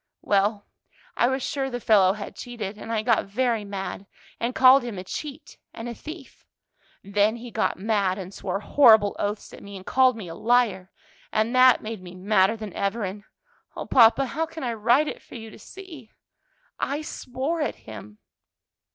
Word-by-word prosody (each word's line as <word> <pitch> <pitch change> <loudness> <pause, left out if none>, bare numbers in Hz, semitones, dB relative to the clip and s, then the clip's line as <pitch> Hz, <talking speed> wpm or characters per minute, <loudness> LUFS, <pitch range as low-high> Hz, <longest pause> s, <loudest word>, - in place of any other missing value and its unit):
"Well, 205 +1 +1 0.5
I 240 - +3
was 265 0 -1
sure 270 -1 -2
the 245 -1 -4
fellow 200 -5 +4
had 205 -1 -8
cheated, 225 -5 -6
and 220 +2 -8
I 220 -1 0
got 230 -3 +2
very 230 +1 0
mad, 200 -1 -6 0.3
and 240 +2 -2
called 260 +1 +7
him 240 -5 -6
a 185 - -5
cheat 295 +9 -8 0.2
and 225 - -6
a 240 - -4
thief. 310 +3 -11 0.6
Then 205 +2 +1
he 235 0 -9
got - - -1
mad 200 -2 0
and 190 0 -8
swore 195 +1 -4
horrible 220 -6 +5
oaths 205 +1 -3
at - - -11
me, 200 0 -10
and 190 - -12
called 255 -2 +3
me 200 -5 -7
a 165 - -7
liar, 215 -3 +1 0.4
and 220 +3 0
that 255 -1 +6
made 220 -2 -6
me 180 0 -11
madder 195 +2 +2
than 215 -4 -7
ever, 205 +3 -2
and 200 +2 -6 0.5
O - - -5
papa, 245 +2 +5
how 310 +6 -2
can 320 -1 -8
I 240 -2 -1
write 240 +7 +3
it - - -6
for - - -14
you 225 -2 -9
to - - -14
see? 330 - -12 0.7
I 290 +2 -2
swore 275 +4 -4
at 295 - -1
him." 105 -1 -10
225 Hz, 185 wpm, -25 LUFS, 200-255 Hz, 0.7 s, called